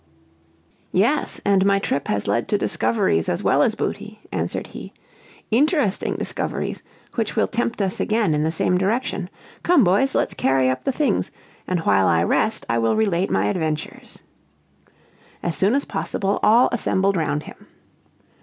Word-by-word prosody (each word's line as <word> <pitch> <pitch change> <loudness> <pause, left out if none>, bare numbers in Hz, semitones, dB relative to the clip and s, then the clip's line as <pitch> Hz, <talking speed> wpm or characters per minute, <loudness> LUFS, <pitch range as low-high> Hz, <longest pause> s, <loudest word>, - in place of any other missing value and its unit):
"Yes, 235 +11 +1
and 195 -1 +3
my 200 0 +3
trip 170 -7 -2
has 100 -1 -1
led 115 +4 0
to 205 - +1
discoveries 195 - 0
as 85 - -2
well - - +3
as - - +2
booty," - - -5
answered - - -3
he; - - -10 0.6
"interesting 280 - +1
discoveries - - -3 0.3
which 225 -3 -2
will 220 - +3
tempt 230 -2 -2
us 190 -1 -1
again 215 -6 +1
in 150 - 0
the 160 +1 0
same 180 +2 +1
direction. 195 -2 -1 0.3
Come, 340 -7 +4
boys, 200 +9 +2
let's - - +1
carry 130 -1 +2
up 130 - -5
the 270 - +2
things, 290 +2 0 0.4
and 180 -2 -1
while 95 -9 +3
I 85 0 +3
rest 215 - 0
I 115 0 +1
will 115 0 +1
relate 195 -4 +1
my 95 +1 +1
adventures." 155 - -4 1.2
As 170 - -1
soon 200 +6 +2
as 280 - 0
possible 200 0 -2
all 230 +4 +5
assembled 195 -4 +1
round 155 -3 -1
him. - - -13
195 Hz, 160 wpm, -22 LUFS, 150-220 Hz, 1.2 s, all